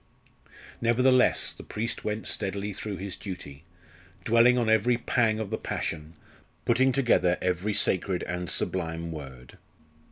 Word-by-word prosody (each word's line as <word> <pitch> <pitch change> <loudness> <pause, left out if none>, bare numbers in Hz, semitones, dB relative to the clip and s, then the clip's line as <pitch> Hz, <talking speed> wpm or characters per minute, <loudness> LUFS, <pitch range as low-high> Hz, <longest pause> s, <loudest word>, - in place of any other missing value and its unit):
Nevertheless, 125 +2 +3
the - - -11
priest 115 +2 -4
went 105 +1 -3
steadily 100 0 -2
through 105 0 -5
his 95 -1 -5
duty, 85 -6 -9 0.6
dwelling 115 +2 +5
on 120 -2 +1
every 110 +2 +3
pang 115 -2 +1
of 110 -2 -4
the 110 - -2
Passion, 80 +1 -4 0.5
putting 130 +3 +3
together 120 -9 +2
every 90 +3 -1
sacred 95 -1 +1
and 90 -1 -4
sublime 85 -2 -2
word. 65 -5 -10
100 Hz, 130 wpm, -27 LUFS, 90-115 Hz, 0.6 s, dwelling